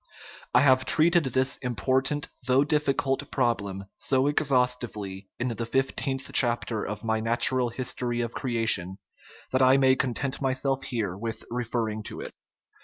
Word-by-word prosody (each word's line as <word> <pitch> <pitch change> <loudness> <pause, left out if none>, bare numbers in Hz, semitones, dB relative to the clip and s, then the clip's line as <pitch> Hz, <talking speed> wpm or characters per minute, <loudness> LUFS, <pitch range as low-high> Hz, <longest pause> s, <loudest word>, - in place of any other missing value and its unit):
I - - +7
have 130 -2 +4
treated 165 +3 +3
this 130 +1 0
important, 130 +5 -1 0.2
though 130 +2 +4
diffi 150 -2 +1
cult, 135 -1 -1
problem 100 -7 -1
so 130 0 +1
exhaustively 125 -9 0
in 125 +1 -1
the 115 -1 -3
fifteenth 135 +1 -1
chap 120 -2 +4
ter 110 -3 -3
of 105 +1 -5
my 110 -1 0
Natural 120 +2 +1
History 120 0 -3
of 115 -1 -4
Creation 110 -7 0 0.5
that 130 - +2
I 130 +1 +6
may 130 -1 +4
con 130 -3 0
tent 140 -1 -3
myself 135 0 0
here 105 -8 -2
with 115 +3 -5
referring 115 -2 -2
to - - -6
it. - - -8
125 Hz, 155 wpm, -26 LUFS, 115-135 Hz, 0.5 s, I